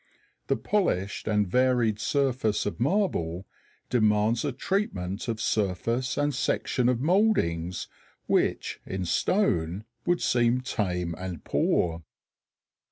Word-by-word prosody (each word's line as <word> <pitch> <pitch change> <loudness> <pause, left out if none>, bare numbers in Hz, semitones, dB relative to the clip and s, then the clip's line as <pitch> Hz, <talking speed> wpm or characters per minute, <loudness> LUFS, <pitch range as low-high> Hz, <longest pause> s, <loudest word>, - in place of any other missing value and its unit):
The - - +1
polished 110 - -1
and 105 -2 +2
varied 120 -1 +2
surface 130 -4 0
of 105 - -3
marble 115 - 0 0.5
demands 110 -1 +2
a 145 - 0
treatment 115 - -2
of 115 -2 -2
surface 110 +5 0
and 145 0 +1
section 125 -1 0
of 125 -1 0
mouldings 135 - +1 0.4
which - - 0
in 95 -1 -4
stone 90 - +1 0.2
would 175 0 +3
seem 120 +1 +2
tame 90 -8 -2
and 90 -4 -6
poor. 85 -1 +1
110 Hz, 110 wpm, -27 LUFS, 95-130 Hz, 0.5 s, would